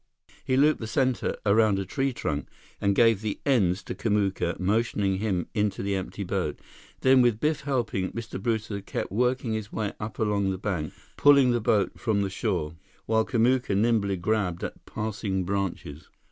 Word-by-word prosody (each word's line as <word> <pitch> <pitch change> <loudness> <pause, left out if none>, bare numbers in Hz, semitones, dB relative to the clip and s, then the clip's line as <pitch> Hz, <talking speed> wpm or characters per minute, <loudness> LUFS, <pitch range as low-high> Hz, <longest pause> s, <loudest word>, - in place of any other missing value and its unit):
He 130 - +1
looped 150 +3 +4
the 110 - -5
center 130 +2 0
around 105 -1 +4
a 95 - -2
tree 135 +7 -1
trunk 75 - -3 0.3
and 100 -1 +2
gave 115 -3 +4
the 110 -2 -3
ends 100 -9 +2
to - - -5
Kamuka, 100 -5 0
motioning 100 -1 +1
him 95 -5 -1
into 105 -3 0
the 100 0 -1
empty 95 +1 -4
boat. 90 -5 -2 0.4
Then, 130 0 +6
with 120 -3 +3
Biff 150 +2 0
helping, 120 -9 -1
Mr. 115 -4 -6
Brewster 110 -2 -2
kept - - -4
working 125 +2 0
his 110 -1 -4
way 105 -2 -2
up 105 +1 -6
along 105 -2 +1
the 95 - -2
bank, 90 -6 -3 0.2
pulling 140 -3 +6
the 120 -1 +1
boat 105 -2 +1
from 105 -4 +1
the 95 - -3
shore, 90 -7 -2 0.3
while 110 0 +2
Kamuka 120 -2 +1
nimbly 105 -3 +2
grabbed 95 -1 -1
at - - -7
passing 105 -3 -2
branches. 95 -6 -4
105 Hz, 175 wpm, -26 LUFS, 95-115 Hz, 0.4 s, Then